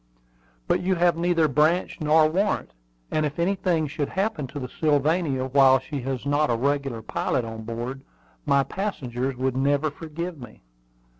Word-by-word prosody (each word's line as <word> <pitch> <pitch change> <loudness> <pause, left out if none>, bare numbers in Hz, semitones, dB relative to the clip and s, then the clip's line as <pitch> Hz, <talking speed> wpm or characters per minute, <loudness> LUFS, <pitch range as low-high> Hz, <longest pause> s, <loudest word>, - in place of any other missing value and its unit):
"But - - +2
you 185 +1 +1
have 175 -1 +3
neither 170 -1 +2
branch 155 +6 +1
nor 155 +1 +5
warrant; 195 +6 0 0.4
and 155 - +1
if 150 -1 -2
anything 175 -2 +1
should 145 -1 -3
happen 190 -7 -1
to 140 - -9
the 125 - -4
Sylvania 150 -1 +1
while 130 0 +5
she 135 +2 -5
has 130 0 -4
not 145 +1 +2
a 120 - +2
regular 135 -2 -1
pilot 120 - -1
on 110 -1 -7
board, 120 +4 -5 0.4
my 140 - +3
passengers 135 - -3
would 130 0 -1
never 145 +3 +1
forgive 165 +2 -6
me." 120 - -12
145 Hz, 160 wpm, -25 LUFS, 130-165 Hz, 0.4 s, nor